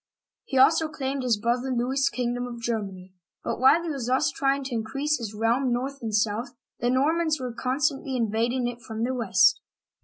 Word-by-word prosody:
He 265 - -2
also 310 +4 +5
claimed 275 -3 -3
his 245 -4 +1
brother 240 +4 -1
Louis's 260 +4 +1
kingdom 245 -3 -2
of 240 -1 -7
Germany; 195 -6 -4 0.3
but - - -3
wnile 280 +6 +5
he 335 - -3
was 265 -5 -4
thus 265 +4 +2
trying 275 -1 0
to 265 -1 -5
in 225 -1 -1
crease 280 +6 -1
his 215 -3 -6
realm 235 +4 +1
north 265 +3 -2
and 225 -2 -3
south, 215 +4 0 0.2
the 240 - 0
Normans 310 +4 +2
were 250 -2 -4
con 255 +2 -2
stantly 275 -3 0
invading 235 +2 0
it 240 0 -6
from 220 0 -5
the 255 +2 0
west. 205 -5 +3
250 Hz, 195 wpm, -26 LUFS, 230-275 Hz, 0.3 s, also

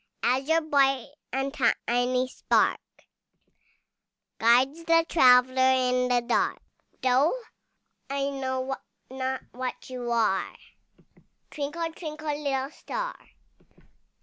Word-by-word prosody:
As 260 +3 +1
your 325 +1 +4
bright 275 -5 +2 0.2
and 270 +2 -2
tiny 250 -1 +1
spark 255 - +1 1.6
Guides 260 +8 +3
the 330 0 +4
traveller 255 -3 +5
in 250 -1 +1
the 245 -1 +1
dark, 245 - +1 0.4
Though 265 - +3 0.7
I 275 0 -1
know 260 -1 -3 0.4
not 265 0 -3
what 255 +1 -6
you 245 -2 -4
are, 220 -5 +1 1.0
Twinkle, 325 +3 -4
twinkle, 310 -2 -5
little 275 -2 -2
star! - - -5
265 Hz, 95 wpm, -27 LUFS, 250-290 Hz, 1.6 s, traveller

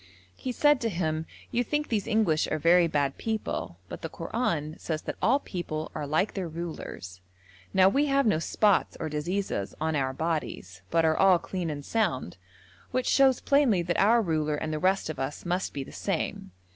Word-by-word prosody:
He 255 - -4
said 295 +2 +3
to 230 - 0
him: 160 -4 -2 0.2
'You 245 - +1
think 295 +4 -1
these 210 -4 -1
English 210 -9 +2
are 155 - -1
very 170 +2 +5
bad 145 -3 -1
people, 215 - -3
but - - -8
the 165 - -4
Koran 165 -4 -2
says 155 -2 -3
that - - -4
all 265 +5 +4
people 160 - -5
are 150 -2 -4
like 160 +8 +1
their 190 -3 -3
rulers; 155 - -7 0.5
now 190 -1 +5
we 280 +9 +3
have 275 -1 +3
no 210 -8 +3
spots 205 +4 +2
or 160 - -3
diseases 155 - -2
on 160 0 0
our 135 -2 0
bodies, 135 - -3
but 165 +5 +3
are 160 0 +3
all 190 0 +5
clean 175 0 -4
and 145 -2 -5
sound, 170 - -1 0.5
which 255 -1 -1
shows 265 -2 +4
plainly 265 -11 +3
that 175 0 -1
our 230 +3 +5
ruler 155 -4 0
and 155 +1 -3
the 155 - -2
rest 190 +3 +2
of 155 -3 -5
us 135 +5 -4
must 180 +2 -1
be 140 - -4
the - - -12
same. - - -3
170 Hz, 195 wpm, -28 LUFS, 155-215 Hz, 0.5 s, very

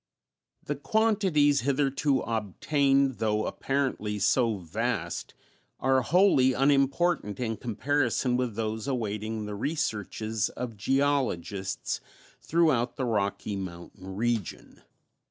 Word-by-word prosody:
The - - -3
quantities 190 - +2
hitherto 140 +1 +1
obtained, 135 - +1
though 110 -1 +1
apparently 130 -6 -1
so 115 +2 +2
vast, 85 -4 -3 0.4
are 130 0 +3
wholly 145 -4 +4
unimportant 140 - +2
in 115 -3 -1
comparison 125 +2 0
with 125 -4 -1
those 110 +2 -3
awaiting 110 -3 -2
the 105 - -5
researches 110 - -2
of 125 -3 -6
geologists 115 -6 -1 0.4
throughout 150 -8 +2
the 130 - -2
Rocky 105 -2 -1
Mountain 95 +1 -8
region. 115 -2 -3
125 Hz, 100 wpm, -28 LUFS, 105-140 Hz, 0.4 s, wholly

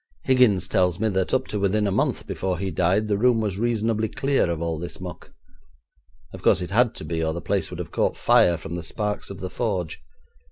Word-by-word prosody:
Higgins 120 -9 +4
tells 90 -2 +1
me 110 - +1
that 95 -2 0
up 130 0 +1
to 105 - -2
within 100 +2 +1
a 100 - 0
month - - 0
before 95 -1 -2
he 95 +1 -3
died 90 +6 +1
the 100 -1 0
room 120 0 +4
was 105 -3 -2
reasonably 110 -1 0
clear 135 -7 +1
of 85 -2 -2
all 85 -1 -2
this 85 - -7
muck. - - -9 1.0
Of - - -9
course - - +4
it 90 - -7
had 120 +2 +3
to - - -7
be, 80 +1 -2
or 80 0 0
the 85 - -4
place - - -1
would - - -7
have - - -6
caught - - 0
fire 85 -1 +4
from 80 +1 -8
the 90 - -3
sparks 105 +4 -3
of 100 -1 -8
the 95 - -4
forge. 95 - -2
100 Hz, 230 wpm, -24 LUFS, 85-110 Hz, 1.0 s, Higgins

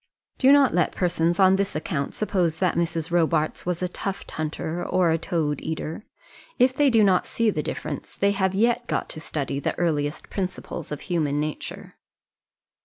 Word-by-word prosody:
Do 265 0 +6
not 280 -2 +6
let 175 -1 +2
persons 175 -1 +1
on 190 0 +6
this 195 -4 -1
account 150 -2 -2
suppose 180 -6 0
that 185 0 +1
Mrs. 165 -1 -1
Robarts 165 -2 +1
was 180 0 -1
a - - +1
tuft 195 +2 -5
hunter, 160 +2 -3
or 175 -2 +2
a 165 - +1
toad 155 -4 -1
eater. 160 +5 -5 0.5
If 255 +1 +4
they 290 0 +4
do 225 -3 +5
not 190 -3 +3
see 230 -2 +1
the 155 - -1
difference - - -6
they 200 0 +3
have 190 -1 0
yet 235 +3 +2
got - - -2
to 155 - -7
study 140 -3 -3
the - - -2
earliest 150 -4 -1
principles 185 -5 -4
of 150 - -4
human 155 -5 0
nature. 150 0 -5
175 Hz, 180 wpm, -25 LUFS, 155-195 Hz, 0.5 s, Do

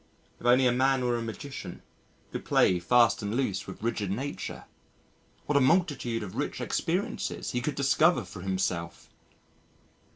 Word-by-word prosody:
If 120 - -3
only 125 +2 +5
a 125 - +5
man 130 +1 +2
were 120 -1 +1
a 120 - -2
magician, 115 +5 -7 0.5
could - - -5
play 90 -1 +3
fast 120 +8 +4
and 105 +2 -3
loose 100 -7 -1
with 95 - -9
rigid 110 -4 -1
Nature? 130 +9 -4 0.8
what 150 - -1
a - - +4
multitude 135 - +1
of 95 - -7
rich - - -3
experiences - - -2
he 125 - -1
could 145 +4 -2
discover 155 +5 +3
for 90 - -10
himself! 95 -3 -3
120 Hz, 155 wpm, -28 LUFS, 100-135 Hz, 0.8 s, only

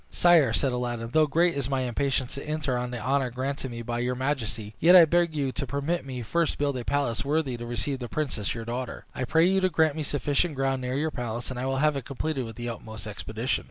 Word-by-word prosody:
"Sire," 170 -8 +5
said 115 +5 +1
Aladdin, 120 -2 -3
"though 155 -1 +5
great 170 +4 +3
is 140 -3 -2
my 135 -1 0
impatience 130 +1 -1
to 140 - -5
enter 150 -4 -1
on 125 0 -2
the 125 - -4
honor 130 +3 +1
granted 130 +2 -3
me 115 -1 -6
by 120 +1 -2
your 125 +1 0
majesty, 115 -6 -2
yet 175 +3 +7
I 175 -2 +10
beg 170 0 +2
you 140 -3 0
to 140 +1 -4
permit 140 +2 -2
me 125 -2 -5
first 165 +8 +1
to - - -13
build 140 -3 0
a - - -5
palace 140 -4 0
worthy 145 -2 0
to 120 0 -6
receive 120 +3 -2
the 120 -2 -6
princess 125 -10 -2
your 115 -1 -5
daughter. 120 +1 -4
I 130 - -2
pray 160 +6 +4
you 190 +1 +3
to 185 - +3
grant 160 -3 +2
me 160 - -3
sufficient 145 +2 0
ground 135 -1 0
near 125 +1 -2
your 155 +2 0
palace, 120 -2 -4
and 125 - -5
I 130 - -2
will 135 0 0
have 150 +1 +3
it 135 -3 -4
completed 140 -1 -2
with 115 - -8
the 120 0 -5
utmost 110 -2 -7
expedition." 110 +4 -2
135 Hz, 255 wpm, -27 LUFS, 120-150 Hz, -, I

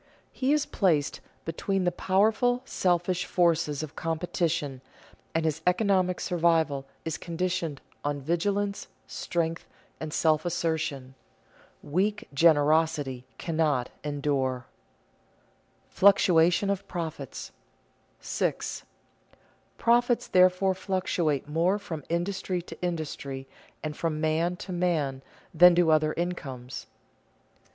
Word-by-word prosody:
He 260 +1 0
is 300 -1 +2
placed 155 -7 +1 0.3
between 190 +4 -1
the 175 - +2
powerful, 220 +7 +2
selfish 180 -3 0
forces 165 -4 +1
of 155 - -8
competition, 165 -4 -2 0.5
and 165 0 +1
his 160 0 -1
economic 185 -1 +2
survival 160 -5 +1 0.2
is 160 - -3
conditioned 170 -3 -2 0.2
on 145 0 -1
vigilance, 200 +7 -1 0.2
strength, 165 -1 -3 0.3
and 155 -1 -5
self 155 -1 +2
assertion. 160 -6 -2 0.7
Weak 195 +7 -1
generosity 150 -3 +3
cannot 155 -6 0
endure. 140 -4 -1 0.2
[Sidenote: - - -37
Fluctuation 185 -1 +5
of 200 0 -3
profits] 160 -6 -5 0.7
6. - - -2 0.9
_Profits 240 +1 +2
therefore 185 +1 +4
fluctuate 180 -7 -1
more 170 +6 +2
from 160 -7 -6
industry 180 +2 -1
to - - -11
industry 145 -6 -4 0.4
and 155 -1 -3
from 160 -2 -2
man 160 +3 +1
to 180 +1 -8
man 160 -7 0 0.3
than 175 +1 +8
do 170 -2 +4
other 155 0 +3
incomes. 135 -8 -5
165 Hz, 105 wpm, -27 LUFS, 150-180 Hz, 0.9 s, than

